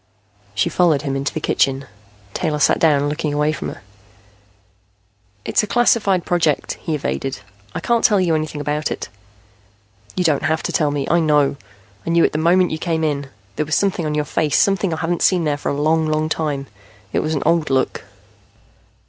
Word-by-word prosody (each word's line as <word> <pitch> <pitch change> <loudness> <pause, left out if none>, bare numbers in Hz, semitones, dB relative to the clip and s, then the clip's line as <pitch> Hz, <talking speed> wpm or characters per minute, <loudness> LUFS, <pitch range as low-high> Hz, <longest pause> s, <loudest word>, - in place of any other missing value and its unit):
She - - +2
followed 165 -5 +2
him 135 -2 -2
into 135 +1 -1
the - - -4
kitchen. 135 0 0 0.5
Taylor 155 -4 -1
sat 145 - +3
down, 145 -3 +3
looking 150 0 -2
away 150 +1 +2
from 155 - -4
her. - - -11 1.6
"It's - - +2
a 210 - -4
classified 205 -5 +2
project," 160 -4 0
he 160 - -2
evaded. 135 -5 -3 0.3
"I - - -3
can't 235 -1 +1
tell 205 -2 +4
you 175 -3 +2
anything 155 -1 -2
about 150 +1 -1
it." - - -5 1.1
"You 180 - +2
don't 155 -5 +2
have 160 0 0
to - - -2
tell 150 -2 +1
me. 145 -1 -2
I 170 - +3
know. 150 -3 +2 0.5
I - - -5
knew 170 0 +4
it - - +3
the 155 - -2
moment 180 +3 +3
you 155 - -3
came 160 -1 -1
in. 145 -3 -1 0.3
There 155 - 0
was 155 - +1
something 185 -5 0
on 150 - -2
your 150 -1 0
face, 150 -1 0
something 195 -2 +2
I 160 - -2
haven't 170 +1 -1
seen 180 -3 +3
there 150 -2 +1
for 145 - -4
a 140 - -2
long, 160 +1 +2
long 155 0 0
time. 150 -3 -2 0.5
It - - +2
was 155 +1 -1
an 140 - -2
old 165 -2 +2
look." 135 -1 0
155 Hz, 200 wpm, -20 LUFS, 145-170 Hz, 1.6 s, tell